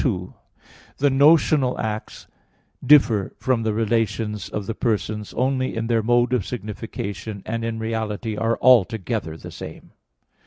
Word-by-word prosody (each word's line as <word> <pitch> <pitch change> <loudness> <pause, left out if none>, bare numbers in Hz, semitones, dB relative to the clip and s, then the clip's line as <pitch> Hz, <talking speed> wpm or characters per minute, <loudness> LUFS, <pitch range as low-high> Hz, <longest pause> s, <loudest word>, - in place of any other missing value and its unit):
2: 90 -9 -2 0.6
The 145 - +3
notional 140 -1 +4
acts 110 -1 -4 0.6
differ 120 -9 +4
from 130 -3 0
the 110 -1 0
relations 110 -1 -1
of 105 - -4
the 115 - -3
persons 105 -2 -2
only 130 +1 0
in 115 0 -2
their 115 -1 +1
mode 120 +2 +2
of 125 -6 +1
signification; 105 -2 -6
and 115 +1 -3
in 115 0 -2
reality 110 -1 -3
are 115 +2 0
altogether 100 -9 +3
the - - -10
same. - - -10
115 Hz, 140 wpm, -23 LUFS, 105-125 Hz, 0.6 s, notional